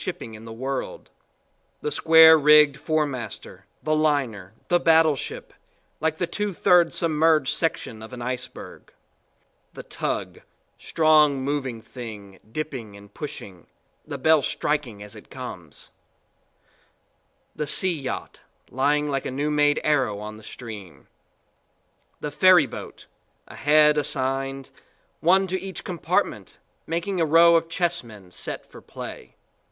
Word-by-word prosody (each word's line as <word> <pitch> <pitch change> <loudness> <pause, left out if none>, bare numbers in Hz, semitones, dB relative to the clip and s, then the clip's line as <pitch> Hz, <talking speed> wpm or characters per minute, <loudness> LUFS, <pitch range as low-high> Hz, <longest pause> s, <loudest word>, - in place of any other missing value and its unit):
shipping 115 - -6
in 110 +1 -11
the 115 - -9
world: 130 +4 -5 0.7
the 150 - -2
square 160 +2 +7
rigged 150 -1 +6
four 155 +1 0
master, 125 -7 -7 0.2
the 155 0 +1
liner, 135 -11 0 0.2
the 175 - +3
battleship, 160 -4 +1 0.5
like 160 0 -1
the 175 - 0
two 205 +2 -4
thirds 175 -1 +4
submerged 155 -3 +2
section 115 -8 -3
of 110 - -10
an 125 - -8
iceberg; 125 +1 -7 0.8
the - - -9
tug - - -4 0.4
strong 150 -4 +3
moving 135 -5 -3
thing, 105 -6 -10
dipping 125 -8 -6
and 100 0 -16
pushing, 95 - -9 0.4
the 145 -2 -6
bell 160 +3 +4
striking 130 -8 -2
as 105 +1 -11
it 105 - -14
comes; 95 - -9 1.6
the 150 - -3
steam 170 -1 0
yacht, - - -5 0.3
lying 145 +3 +1
like 135 -2 -2
a - - -3
new 145 +3 -2
made 145 0 +3
arrow 140 -8 +1
on 105 +1 -7
the - - -14
stream; 105 -5 -10 1.1
the 150 - -5
ferry 180 0 +6
boat 130 - -10 0.4
a - - -12
head 150 +1 +4
assigned, 135 -1 -2 0.5
one 190 +4 +4
to 190 -1 -3
each 190 -1 -7
compartment, 175 -3 -2 0.3
making 170 +2 -2
a - - +4
row 165 +2 +6
of 165 0 +1
chessmen 120 - -3
set - - -6
for - - -14
play. - - -10
145 Hz, 135 wpm, -24 LUFS, 120-160 Hz, 1.6 s, square